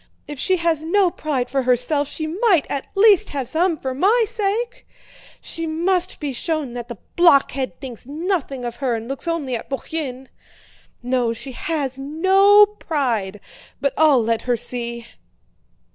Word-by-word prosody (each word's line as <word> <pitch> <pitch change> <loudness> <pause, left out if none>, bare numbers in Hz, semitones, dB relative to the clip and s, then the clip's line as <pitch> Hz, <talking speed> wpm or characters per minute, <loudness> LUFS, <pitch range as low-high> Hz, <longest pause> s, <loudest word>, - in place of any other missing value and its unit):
If 295 -2 -8
she 375 +5 +2
has 335 -2 0
no 360 +2 +2
pride 280 -7 -2
for 270 +1 0
herself 255 +4 +1
she 315 - -4
might 355 - +2
at 275 - -3
least 415 0 +5
have 275 -4 -4
some 330 +4 +1
for 265 -2 -4
my 410 - +3
sake! 455 +2 -2 0.5
She 330 0 -5
must 350 +3 0
be 290 -3 -3
shown 305 -1 -2
that 240 -1 -6
the 235 -3 -8 0.2
blockhead 280 -6 +3
thinks 250 -3 -9
nothing 295 -4 -3
of 240 -1 -5
her 260 -4 0
and 225 0 -6
looks 275 +5 -5
only 300 -7 -1
at 225 - -7
Bourienne. 270 -2 -5 0.7
No, 245 -2 0
she 260 +4 -6
has 270 -1 -3
no 380 +8 +5
pride... 250 - -2 0.4
but 280 -1 0
I'll 295 -6 +4
let 225 0 0
her 240 - +3
see...." 235 0 -4
290 Hz, 160 wpm, -21 LUFS, 250-345 Hz, 0.7 s, least